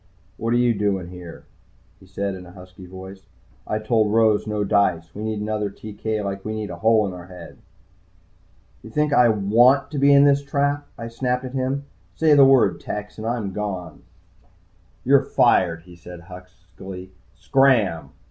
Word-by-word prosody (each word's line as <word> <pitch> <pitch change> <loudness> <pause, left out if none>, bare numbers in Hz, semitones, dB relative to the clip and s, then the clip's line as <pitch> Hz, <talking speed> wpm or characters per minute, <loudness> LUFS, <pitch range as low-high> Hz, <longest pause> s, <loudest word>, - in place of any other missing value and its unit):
"What 115 - -3
you 120 -1 +3
doing 100 -4 -2
here?" 90 -2 -11 0.6
he 95 - -19
said 100 +1 -3
in 90 -1 -10
a 90 - -14
husky 90 0 -13
voice. 95 +1 -11 0.4
"I 105 - -1
told 110 -1 +1
Rose 110 -1 +2
no 105 -1 -1
dice. 95 -5 0
We 105 - -8
need 110 -1 -3
another 105 -1 -2
TK 110 +1 -5
like 100 -1 -5
we 110 0 -4
need 105 -3 -5
a 85 - -7
hole 110 +2 +3
in 95 - -4
the 90 -1 -10
head." 90 -1 -12 1.2
"You - - -12
think 150 +4 0
I 125 -4 +5
want 120 +7 +3
to 145 - -3
be 140 +1 +5
in 140 0 +7
this 140 0 +4
trap?" 145 +1 -1
I 115 - -6
snapped 125 +2 -2
at 130 - -8
him. 135 +1 -2 0.3
"Say 160 -2 +3
the 140 -1 +7
word, 135 -2 +4
Tex, 105 +1 -7
and 110 - -5
I'm 115 -5 -3
gone." 95 -6 -5 1.0
"You're 135 +1 +4
fired," 90 -11 +2
he 90 0 -15
said 85 0 -12
huskily. 90 +1 -12 0.2
"Scram!" 125 - +2
105 Hz, 175 wpm, -22 LUFS, 95-125 Hz, 1.2 s, in